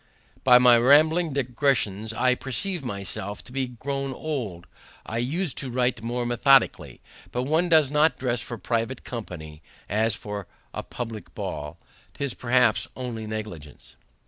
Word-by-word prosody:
By 125 -1 +8
my 125 -1 +7
rambling 155 +6 +5
digressions 120 -6 0
I 125 +3 +2
perceive 140 +7 -3
myself 100 -2 -5
to - - -12
be 130 0 -1
grown 135 +2 -4
old. 120 - -4 0.4
I 115 - -3
us'd 155 +7 -1
to 135 - -4
write 125 -1 0
more 120 +1 -2
methodically. 120 +2 +3 0.3
But 125 - -1
one 160 +6 +1
does 155 -4 +5
not 150 -2 +3
dress 125 -3 -1
for 120 - -6
private 115 +4 -2
company 80 -10 -7 0.3
as 110 +2 +1
for 105 -3 -6 0.3
a - - -3
publick 115 -3 -7
ball. 75 +3 -5 0.4
'Tis 140 -3 -2
perhaps 125 -2 +2
only 120 -4 -5
negligence. 90 - -7
125 Hz, 145 wpm, -25 LUFS, 110-135 Hz, 0.4 s, By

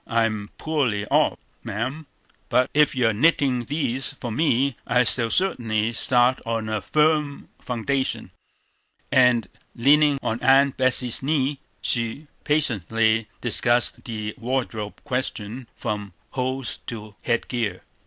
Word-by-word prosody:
I'm 110 -3 0
poorly 130 -10 -1
off, - - +2 0.3
ma'am; 130 +9 -4 0.4
but 125 0 +2
if 150 -1 +3
you 120 -3 +3
are - - 0
knitting 130 -1 +2
these 135 -2 -2
for 120 - -5
me, 135 0 +1
I 125 - +3
shall 115 0 +5
certainly 115 - 0
start 125 +2 +3
on 115 -2 -3
a 110 -1 -2
firm 150 +2 +1
foundation." 130 +3 -2 0.8
And, 125 -5 +4 0.3
leaning 145 +3 +4
on 115 +2 -2
Aunt 135 +1 +4
Betsey's 130 -2 +3
knee, 140 0 0 0.2
she 115 +5 -1 0.2
patiently 115 - +1
discussed 120 0 +2
the 110 -2 -4
wardrobe 115 -4 -3
question 125 -1 -4
from 105 -4 -4 0.2
hose 130 0 -3
to 110 -2 -7
head 115 - -1
gear. 110 -7 -2
125 Hz, 125 wpm, -23 LUFS, 115-135 Hz, 0.8 s, shall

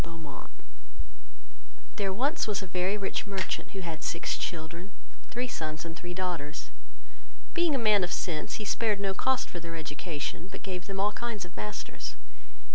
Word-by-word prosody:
There 195 -2 +3
was 270 - +3
once 205 -2 +2
a - - -2
very 185 +2 +2
rich 200 +1 0
merchant, 195 -2 0
who - - 0
had 165 -3 -3
six 170 - +1
children, 170 +3 -2 0.4
three 245 +2 0
sons, 155 -8 -2
and 165 0 -3
three 175 +1 -4
daughters; 175 -5 -1 0.8
being 340 -4 +5
a - - +5
man 215 -5 +6
of 175 - +1
sense, 160 -5 0
he 215 - -2
spared 215 0 +3
no 195 -1 +2
cost 260 +6 +3
for 175 - -4
their 165 0 -4
education, 160 +1 -2
but - - -6
gave 185 -2 -2
them 195 -1 -1
all 205 +2 +5
kinds 220 -3 -2
of 175 - -11
masters. 210 0 -3
190 Hz, 165 wpm, -32 LUFS, 170-210 Hz, 0.8 s, man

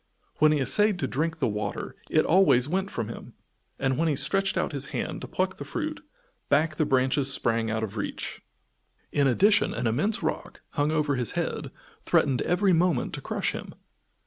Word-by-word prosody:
When 155 0 +5
he 155 - +3
essayed 205 +9 +2
to - - -1
drink 165 +5 -1
the 140 - +1
water 105 -2 -4
it - - +3
always 160 -8 +4
went 190 +4 -1
from 110 - -3
him, 115 - -9 0.4
and 135 +1 0
when 165 - +2
he 150 - +1
stretched 195 +9 +1
out - - 0
his 140 -2 -3
hand - - -4
to - - -6
pluck 190 +1 -1
the - - -6
fruit, 310 -2 -4 0.5
back 155 +2 +2
the 155 - +1
branches 130 +1 +2
sprang 115 -4 0
out 110 0 -1
of 110 0 -5
reach. 100 - -4 0.7
In 140 -1 +2
addition 205 - +3
an - - -2
immense 155 - 0
rock, 155 - -4
hung 145 +1 0
over 150 -3 +1
his 120 -4 -1
head, - - -2 0.3
threatened 130 -3 +2
every 185 +1 +2
moment 170 -5 +1
to - - -5
crush - - -1
him. - - -8
150 Hz, 190 wpm, -27 LUFS, 130-180 Hz, 0.7 s, When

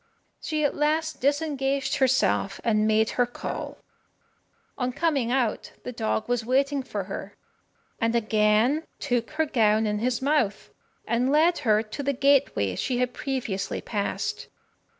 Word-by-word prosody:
She 310 -1 -1
at 290 - +1
last 310 +1 0
disengaged 280 -1 0
herself, 260 -6 +2
and 215 -2 +2
made 220 0 +2
her 245 - +3
call. 245 - -6 1.0
On 250 -1 -1
coming 275 -4 0
out, 250 -4 -1
the - - -5
dog 220 -2 -2
was 245 -1 0
waiting 275 +4 +1
for 210 -6 -4
her, 195 +1 -7 0.6
and 230 0 +1
again 220 +6 +2
took 245 -3 -1
her 315 +1 0
gown 220 -5 +2
in 210 -1 -1
his 245 +2 0
mouth, 265 -8 0 0.4
and 245 +3 +1
led 325 +4 +4
her 220 -6 +2
to 220 +6 -6
the 280 0 0
gateway 270 - +2
she 250 - -1
had 250 0 0
previously 240 -8 -3
passed. 205 -3 -3
250 Hz, 145 wpm, -26 LUFS, 220-280 Hz, 1.0 s, led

